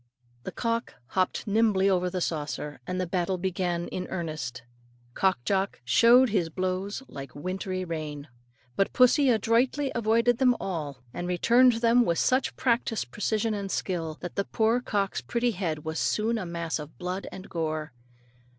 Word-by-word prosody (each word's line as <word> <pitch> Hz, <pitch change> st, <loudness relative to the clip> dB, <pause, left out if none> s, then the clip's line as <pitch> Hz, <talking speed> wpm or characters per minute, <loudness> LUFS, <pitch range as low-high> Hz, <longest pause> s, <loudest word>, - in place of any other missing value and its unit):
The -, -, -4 dB
cock 230 Hz, 0 st, -2 dB
hopped 185 Hz, -1 st, 0 dB
nimbly 210 Hz, -2 st, +3 dB
over 180 Hz, -2 st, +2 dB
the 180 Hz, 0 st, -3 dB
saucer, 150 Hz, -3 st, -3 dB
and 185 Hz, 0 st, -2 dB
the 185 Hz, -, 0 dB
battle 180 Hz, +1 st, -1 dB
began 175 Hz, -1 st, -1 dB
in 185 Hz, 0 st, -4 dB
earnest. 155 Hz, -9 st, -4 dB, 0.5 s
Cock 190 Hz, -8 st, +1 dB
Jock 195 Hz, 0 st, 0 dB
"showered 235 Hz, -, +6 dB
his 180 Hz, -6 st, +1 dB
blows 185 Hz, +6 st, -3 dB
like 135 Hz, -2 st, -9 dB
wintry 185 Hz, +3 st, -3 dB
rain." 155 Hz, -3 st, -5 dB, 0.5 s
But 195 Hz, -, +1 dB
pussy 260 Hz, +2 st, +5 dB
adroitly 245 Hz, +5 st, +2 dB
avoided 230 Hz, +1 st, +2 dB
them 250 Hz, -2 st, +4 dB
all, 150 Hz, -8 st, -4 dB
and 175 Hz, -, -4 dB
returned 240 Hz, +8 st, +5 dB
them 230 Hz, +1 st, +4 dB
with 170 Hz, -7 st, 0 dB
such 255 Hz, +1 st, +1 dB
practised 230 Hz, -, 0 dB
precision 215 Hz, -, 0 dB
and 200 Hz, -2 st, -3 dB
skill, 165 Hz, -5 st, -2 dB
that 175 Hz, -, -5 dB
the 200 Hz, -, 0 dB
poor 225 Hz, +2 st, +1 dB
cock's 200 Hz, -5 st, -1 dB
pretty 240 Hz, 0 st, 0 dB
head 165 Hz, -7 st, -3 dB
was 160 Hz, 0 st, -2 dB
soon 225 Hz, +2 st, +1 dB
a 185 Hz, -, -5 dB
mass 170 Hz, -1 st, -3 dB
of 150 Hz, +1 st, -9 dB
blood 180 Hz, +2 st, -4 dB
and 190 Hz, +1 st, -9 dB
gore. 155 Hz, -3 st, -3 dB
190 Hz, 160 wpm, -27 LUFS, 170-230 Hz, 0.5 s, showered